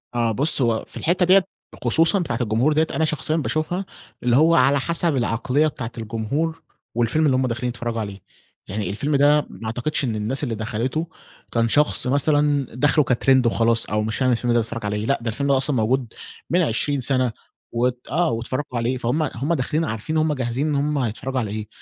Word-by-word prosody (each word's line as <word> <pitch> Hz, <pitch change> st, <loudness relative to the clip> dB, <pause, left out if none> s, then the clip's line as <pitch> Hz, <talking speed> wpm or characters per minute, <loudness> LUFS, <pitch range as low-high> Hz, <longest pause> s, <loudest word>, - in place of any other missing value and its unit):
آه 115 Hz, -1 st, +1 dB
بُص 140 Hz, +5 st, +4 dB
هو 115 Hz, -3 st, +1 dB
في -, -, -9 dB
الحِتَّة 180 Hz, +2 st, +1 dB
ديّة 190 Hz, +1 st, +6 dB, 0.4 s
خصوصًا 165 Hz, -, +3 dB
بتاعة 175 Hz, -, -2 dB
الجمهور 120 Hz, +6 st, +2 dB
ديّة، 160 Hz, +1 st, +2 dB
أنا 160 Hz, -, +2 dB
شخصيًا 155 Hz, +1 st, -1 dB
باشوفها 165 Hz, +4 st, -1 dB, 0.4 s
اللي 120 Hz, -1 st, +3 dB
هو 160 Hz, +4 st, +5 dB
على 135 Hz, +2 st, +4 dB
حسب 170 Hz, +1 st, 0 dB
العقلية 125 Hz, +4 st, +1 dB
بتاعة 130 Hz, -5 st, -5 dB
الجمهور 120 Hz, +9 st, -3 dB, 0.3 s
والفيلم 120 Hz, +7 st, +2 dB
اللي 135 Hz, -3 st, +3 dB
هُم 130 Hz, 0 st, +1 dB
داخلين 125 Hz, +1 st, -2 dB
يتفرّجوا 120 Hz, -1 st, -4 dB
عليه، 100 Hz, -3 st, -6 dB, 0.5 s
يعني 100 Hz, -1 st, -3 dB
الفيلم 140 Hz, +9 st, -1 dB
ده 145 Hz, +1 st, +4 dB
ما -, -, -10 dB
أعتقدش 120 Hz, +8 st, -1 dB
إن 120 Hz, -5 st, -1 dB
الناس 110 Hz, +7 st, -2 dB
اللي 120 Hz, -5 st, -2 dB
دخلته 115 Hz, +9 st, -2 dB, 0.4 s
كان 115 Hz, -1 st, +1 dB
شخص 150 Hz, 0 st, +2 dB
مثلًا 145 Hz, 0 st, +2 dB
داخله 145 Hz, +3 st, +3 dB
كTrend 130 Hz, +1 st, +3 dB
وخلاص، 115 Hz, 0 st, +2 dB
أو 105 Hz, 0 st, -1 dB
مش 110 Hz, +1 st, -2 dB
فاهم 130 Hz, -1 st, +2 dB
الفيلم 120 Hz, 0 st, +1 dB
ده 120 Hz, -, +4 dB
بيتفرّج 115 Hz, -1 st, -4 dB
على 105 Hz, 0 st, -1 dB
إيه، 105 Hz, +1 st, -3 dB
لأ، 140 Hz, +3 st, +1 dB
ده 115 Hz, -, -6 dB
الفيلم 140 Hz, +5 st, -1 dB
أصلًا 135 Hz, +1 st, +1 dB
موجود 120 Hz, +1 st, 0 dB, 0.4 s
من 175 Hz, +6 st, +3 dB
20 145 Hz, 0 st, +1 dB
سَنَة 130 Hz, -1 st, +1 dB, 0.4 s
و 120 Hz, +2 st, +2 dB, 0.2 s
آه، 165 Hz, +3 st, +2 dB
واتفَرّجوا 125 Hz, +3 st, -3 dB
عليه، 120 Hz, +2 st, 0 dB
فهُم 125 Hz, +6 st, 0 dB
هُم 140 Hz, +2 st, -2 dB
داخلين 155 Hz, +2 st, 0 dB
عارفين 110 Hz, +6 st, -3 dB
هُم 155 Hz, -1 st, +2 dB
جاهزين 130 Hz, +1 st, -2 dB
إن 150 Hz, -, 0 dB
هُم 145 Hz, +1 st, 0 dB
هيتفرّجوا 130 Hz, +1 st, -2 dB
على 110 Hz, -4 st, -3 dB
إيه، 105 Hz, 0 st, -5 dB
130 Hz, 200 wpm, -22 LUFS, 115-150 Hz, 0.5 s, ديّة